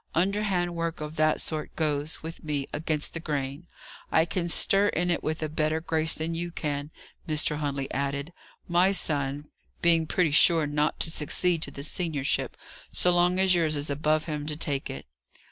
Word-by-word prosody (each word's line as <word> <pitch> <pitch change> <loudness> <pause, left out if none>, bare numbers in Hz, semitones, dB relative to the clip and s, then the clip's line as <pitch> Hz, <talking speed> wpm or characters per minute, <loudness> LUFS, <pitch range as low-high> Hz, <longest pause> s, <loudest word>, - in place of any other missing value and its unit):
Underhand 185 -1 +1
work 165 -1 -3
of 150 0 -6
that 155 0 +3
sort 155 -2 -2
goes, 150 -1 -1
with 165 +1 -8
me, 145 -3 -2
against 150 0 -1
the 165 - -3
grain. 145 0 -4 0.4
I 160 - +4
can 170 0 -2
stir 195 +4 +4
in 175 -2 0
it 170 - 0
with 155 +1 -2
a - - 0
better 155 +1 0
grace 160 -1 0
than 160 +1 -3
you 170 +1 -3
can," 145 -3 -3 0.4
Mr. 150 -1 +2
Huntley 140 -2 -2
added: 140 +4 -2 0.3
"my 180 +3 +4
son 145 -4 -2 0.3
being 165 -2 +4
pretty 165 -1 +2
sure 160 +1 +6
not 150 +1 0
to 160 - 0
succeed 165 +2 +1
to - - -2
the 140 - -8
seniorship, 155 -3 -1 0.3
so 180 - +3
long 175 +1 +3
as 190 -1 +5
yours 160 -3 +2
is 145 0 -1
above 155 +2 +1
him 150 -2 -4
to 150 - -2
take 145 -4 -2
it. 70 - -7
155 Hz, 180 wpm, -27 LUFS, 150-170 Hz, 0.4 s, sure